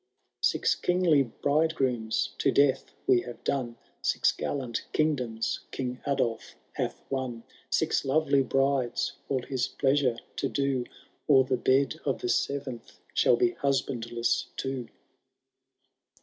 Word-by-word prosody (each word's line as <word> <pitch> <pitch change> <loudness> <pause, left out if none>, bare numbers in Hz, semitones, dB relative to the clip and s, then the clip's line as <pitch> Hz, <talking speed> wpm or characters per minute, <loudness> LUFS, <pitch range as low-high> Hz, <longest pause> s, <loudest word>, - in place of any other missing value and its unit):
Six - - +3
kingly 175 -5 +3
bridegrooms 135 -4 0
to - - +3
death 140 -2 +3 0.2
we 120 - +4
have 120 -1 -9
done. 125 -4 -1 0.2
Six - - +2
gallant 130 -5 -3
kingdoms 125 -8 0 0.2
Song 125 -1 -3
Adolf 120 -5 -1 0.2
hath - - -4
won. 130 -4 -3 0.3
Six - - +1
lovely 140 0 +3
brides 135 -1 +1 0.2
all 130 -3 0
his 130 -1 -1
pleasure 135 -3 +1 0.2
to 135 - 0
do. 135 -3 0 0.4
Or 135 -3 +6
the 130 0 0
bed 135 +5 +2
of 135 - 0
the 120 - -3
seventh 135 -5 -2 0.2
shall - - +4
be 365 -1 +2
husbandless 120 - -1
too. 130 -3 -3
135 Hz, 120 wpm, -28 LUFS, 120-140 Hz, 0.4 s, Or